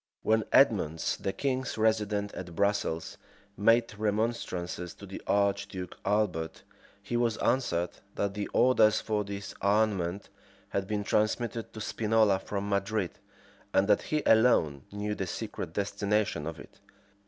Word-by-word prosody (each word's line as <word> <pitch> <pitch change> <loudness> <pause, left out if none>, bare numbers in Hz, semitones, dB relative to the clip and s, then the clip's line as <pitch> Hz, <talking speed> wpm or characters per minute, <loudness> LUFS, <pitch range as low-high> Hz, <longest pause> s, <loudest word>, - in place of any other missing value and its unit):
When 110 0 +2
Edmonds, 90 - +3
the 95 - -2
king's 130 +1 -2
resident 105 -2 +1
at 85 -2 -7
Brussels, 100 -5 -1 0.4
made 115 +3 +3
remonstrances 105 -5 -2
to 100 - -11
the 95 - -8
archduke 100 -2 0
Albert, 95 -6 -1 0.4
he 120 - -4
was 120 -2 +1
answered, 90 -9 +1 0.2
that 100 -1 -1
the 105 0 -3
orders 110 -4 +4
for 105 -1 -1
this 100 0 -6
armament 100 -3 +1 0.4
had 100 -1 -2
been 105 0 -1
transmitted 115 +2 0
to 110 - -7
Spinola 110 -2 +2
from 100 +1 -4
Madrid, 100 -1 -1 0.6
and 95 - +4
that - - +4
he 155 -5 -1
alone 110 - +4
knew 105 +1 -3
the 95 -2 -3
secret 80 - -5
destination 100 -4 0
of 80 -1 -6
it. - - -14
105 Hz, 135 wpm, -29 LUFS, 95-110 Hz, 0.6 s, orders